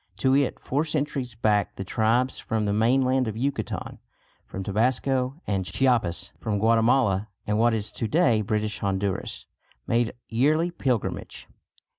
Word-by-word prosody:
To 130 0 +3
it 140 -1 +1
four 145 +4 -1
centuries 145 -6 -2
back 105 -2 +1
the 95 - -5
tribes 115 +6 +1
from 110 -1 -2
the 100 - 0
mainland 130 +3 +2
of 110 0 -4
Yucatan, 140 +4 -3 0.5
from 95 - -6
Tabasco 130 - 0
and 95 -2 -1
Chiapas, 115 -5 0
from 105 -2 -1
Guatemala 115 -1 +3 0.2
and 105 +1 0
what 115 0 +4
is 105 -1 -3
to 115 - -3
day 120 -7 +3
British 105 0 -2
Honduras, 95 -1 -2 0.4
made 120 -1 +1
yearly 155 +9 +2
pilgrimage. 130 - -3
115 Hz, 140 wpm, -25 LUFS, 105-130 Hz, 0.5 s, what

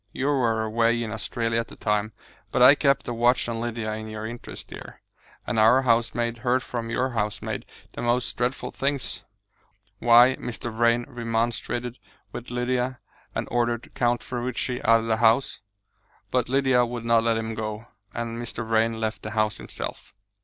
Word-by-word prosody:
You 130 - -3
were 115 -6 +2
away 115 +1 +1
in 110 - -5
Australia 115 +1 -1
at 115 - -3
the - - -12
time, 105 0 -1 0.4
but 125 - +3
I 130 +3 +10
kept 140 -2 +2
a 120 - -2
watch 120 +2 +2
on 115 -1 -3
Lydia 115 -2 -3
in 110 0 -5
your 110 0 -6
interest, 120 +2 -8
dear, - - -10 0.5
and 115 - 0
our 120 +5 +6
housemaid 120 -1 +1
heard 125 +2 +1
from 115 -2 -4
your 130 +3 0
housemaid 105 -3 -3 0.3
the - - -6
most 120 +1 0
dreadful 125 +2 -2
things. 140 0 -2 0.8
Why, 120 +2 +6
Mr. 120 -1 -5
Vrain 120 +1 +2
remonstrated 120 +1 -2 0.3
with 120 - -7
Lydia, 125 +1 -1 0.4
and - - -2
ordered 120 0 -1
Count 120 -1 +1
Ferruci 125 0 -3
out 115 0 +5
of - - -5
the 110 -1 +1
house, 115 +3 +3 0.7
but 125 -2 +1
Lydia 130 -2 +3
would 120 -1 -4
not 115 -1 +4
let 115 -1 +2
him 115 0 -3
go; 110 0 -4 0.3
and 115 0 -4
Mr. 115 0 -4
Vrain 115 0 +2
left 110 -1 -2
the 110 - -5
house 110 -1 0
himself." - - -7
120 Hz, 170 wpm, -25 LUFS, 115-125 Hz, 0.8 s, I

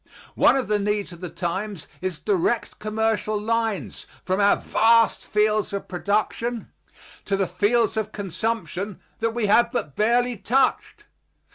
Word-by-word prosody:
One - - +5
of 265 -5 -1
the 210 0 +1
needs 205 -1 -1
of 175 0 -12
the 180 - -5
times 190 +1 -4 0.2
is 185 -2 -3
direct 390 -2 0
commercial 215 0 -1
lines 225 -2 -2 0.2
from 185 +1 0
our 200 - +5
vast 230 0 +3
fields 210 0 +1
of 200 - -4
production 215 +5 -2 0.5
to 195 - 0
the 195 - +1
fields 210 +6 +1
of 215 -1 -2
consumption 205 0 -3 0.2
that 225 0 -1
we 235 -3 0
have 225 +4 +4
but 150 - -3
barely 240 +2 +2
touched. 255 +7 0
215 Hz, 145 wpm, -24 LUFS, 200-230 Hz, 0.5 s, One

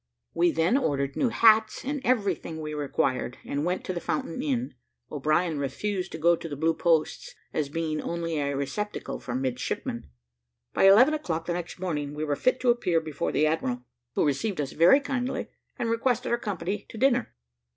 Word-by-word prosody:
We 170 +1 +3
then 165 +11 +2
ordered 140 - -1
new 255 - +2
hats, 220 0 +4
and 285 0 -2
everything 200 - 0
we 150 -1 -5
required, 135 -4 -1
and 145 +1 -2
went 180 +2 -1
to 185 - -2
the 175 - -3
Fountain 160 +8 -2
inn. 260 -4 -1 0.4
O'Brien 155 +2 +1
refused 180 +8 -2
to - - -4
go 170 +2 +4
to 165 - -8
the 145 - -4
Blue 160 +3 +2
Posts, 160 -2 0 0.2
as 150 -3 -1
being 155 0 -2
only 165 -2 -2
a 140 -1 -1
receptacle 210 +10 -3
for 120 - -5
midshipmen. 125 - -3 0.6
By - - +3
eleven 230 +10 +7
o'clock 165 - -2
the 175 - -1
next 175 +1 -5
morning, 150 -5 -3
we 150 - -3
were 145 -2 0
fit 255 - +1
to 250 -1 +5
appear 180 -8 +1
before 155 -3 -3
the 155 - +2
admiral, 130 -6 -1 0.3
who - - +2
received 150 +7 -1
us 140 -2 -2
very 180 - +6
kindly, 260 -3 -2 0.3
and 235 - -1
requested 235 +2 0
our 235 - +2
company 200 -1 -3
to - - -9
dinner. 250 0 +2
170 Hz, 185 wpm, -27 LUFS, 150-225 Hz, 0.6 s, eleven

